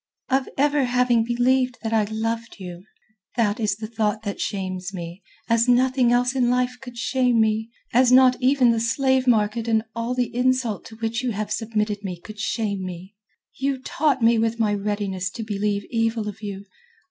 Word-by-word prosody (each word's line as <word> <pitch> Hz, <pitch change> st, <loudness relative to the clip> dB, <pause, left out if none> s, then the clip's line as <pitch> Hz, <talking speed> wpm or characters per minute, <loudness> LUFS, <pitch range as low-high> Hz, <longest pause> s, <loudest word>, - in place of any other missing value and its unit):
"Of 265 Hz, 0 st, +1 dB
my 275 Hz, -, +3 dB
ever 290 Hz, -2 st, +2 dB
having 245 Hz, -2 st, +2 dB
believed 250 Hz, +2 st, +1 dB
that 225 Hz, 0 st, -2 dB
I 220 Hz, -2 st, +3 dB
loved 225 Hz, +2 st, -3 dB
you. 180 Hz, -1 st, -9 dB, 0.5 s
That 220 Hz, -3 st, +1 dB
is 210 Hz, -3 st, 0 dB
the 215 Hz, +1 st, -7 dB
thought 215 Hz, -1 st, -1 dB
that 200 Hz, -2 st, -4 dB
shames 185 Hz, -2 st, -3 dB
me, 175 Hz, 0 st, -7 dB, 0.3 s
as 230 Hz, +1 st, +3 dB
nothing 250 Hz, 0 st, +3 dB
else 245 Hz, +1 st, +2 dB
in 250 Hz, -3 st, +2 dB
life 250 Hz, 0 st, +1 dB
could 245 Hz, -2 st, -10 dB
shame 250 Hz, -1 st, +1 dB
me, 220 Hz, 0 st, +1 dB, 0.2 s
as 250 Hz, +1 st, +5 dB
not 255 Hz, 0 st, +7 dB
even 255 Hz, -1 st, +4 dB
the 230 Hz, -, +1 dB
slave 260 Hz, +3 st, +1 dB
market 220 Hz, 0 st, +2 dB
and 220 Hz, -1 st, +2 dB
all 230 Hz, +2 st, -2 dB
the 245 Hz, -1 st, -1 dB
insult 250 Hz, -5 st, 0 dB
to 220 Hz, -, -11 dB
which 225 Hz, +1 st, -2 dB
you 250 Hz, -3 st, -1 dB
have 210 Hz, +1 st, -4 dB
submitted 210 Hz, -2 st, -2 dB
me 180 Hz, -3 st, -5 dB
could 215 Hz, +4 st, -11 dB
shame 205 Hz, -3 st, -2 dB
me. 185 Hz, +2 st, -8 dB, 0.4 s
You 270 Hz, 0 st, -1 dB
taunt 270 Hz, 0 st, 0 dB
me 230 Hz, 0 st, +5 dB
with 225 Hz, +1 st, 0 dB
my 215 Hz, -2 st, +2 dB
readiness 200 Hz, -2 st, -2 dB
to 225 Hz, +3 st, -6 dB
believe 205 Hz, -1 st, -2 dB
evil 225 Hz, -2 st, 0 dB
of 210 Hz, +1 st, -7 dB
you...." 200 Hz, -1 st, -6 dB
225 Hz, 190 wpm, -23 LUFS, 210-250 Hz, 0.5 s, not